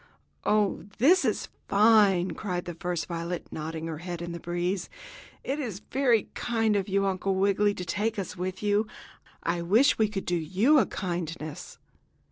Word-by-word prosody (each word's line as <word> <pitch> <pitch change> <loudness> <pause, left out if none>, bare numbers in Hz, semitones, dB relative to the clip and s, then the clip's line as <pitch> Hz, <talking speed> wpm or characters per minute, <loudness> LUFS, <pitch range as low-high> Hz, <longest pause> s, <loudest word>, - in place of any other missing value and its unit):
"Oh, 210 -3 +1
this 310 +11 +5
is 220 -5 -1 0.2
fine!" 200 -4 +5
cried 180 0 -3
the 175 - -5
first 175 0 -3
violet, 170 0 -4
nodding 160 +1 -5
her 160 -2 -5
head 175 0 -5
in 170 0 -5
the 170 - -6
breeze. 175 +2 -2 0.5
"It 275 +3 -2
is 225 -9 -4
very 245 -5 +2
kind 225 -3 0
of 200 -1 -1
you, 195 +1 +2
Uncle 195 0 0
Wiggily 200 +1 +2
to 180 - -5
take 210 +6 -1
us 190 -2 -4
with 185 +2 -4
you. 205 +1 +2 0.6
I 170 +1 0
wish 220 +12 +4
we 220 - +4
could 195 -2 -4
do 175 - +1
you 195 - +3
a - - +2
kindness." 170 -4 -5
190 Hz, 170 wpm, -28 LUFS, 175-215 Hz, 0.6 s, this